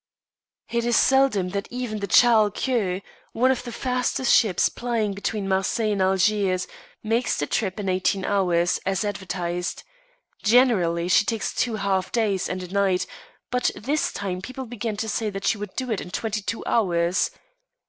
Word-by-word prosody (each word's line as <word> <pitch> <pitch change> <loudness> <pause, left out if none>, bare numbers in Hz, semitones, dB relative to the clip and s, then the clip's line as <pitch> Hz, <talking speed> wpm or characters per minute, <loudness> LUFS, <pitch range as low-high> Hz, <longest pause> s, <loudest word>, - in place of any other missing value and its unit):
It 235 0 0
is 240 0 +1
seldom 265 -9 +3
that 200 +1 -3
even 245 -4 -4
the 200 - -3
Charles 220 -4 +5
Quex, 200 -8 -1 0.3
one 255 +3 +3
of 260 - -1
the 240 - -7
fastest 250 +1 0
ships 205 -7 +4
plying 230 -4 -2
between 200 0 -3
Marseilles 195 +3 0
and 200 -2 0
Algiers, 190 0 +2 0.4
makes 225 +2 0
the 145 - 0
trip 195 +4 -2
in 200 - -3
eighteen 185 +1 0
hours, 180 -3 +1
as 195 +2 -1
advertised. 180 -3 -3 0.6
Generally 200 -8 +3
she 185 - +5
takes 225 -1 -2
two 235 -3 0
half 195 -2 -1
days 210 -5 0
and 185 0 -3
a 180 +1 -9
night, 195 -2 +2 0.5
but 250 0 +2
this 290 +7 -1
time 185 -2 -4
people 255 +5 -7
began 230 -2 -4
to 220 - -2
say 220 0 -1
that 195 -1 -6
she 215 - +1
would 205 -2 -7
do 255 -2 -3
it 215 - -1
in - - -8
twenty 215 +3 -3
two 225 +3 -4
hours. 175 -4 +1
205 Hz, 170 wpm, -24 LUFS, 190-235 Hz, 0.6 s, Charles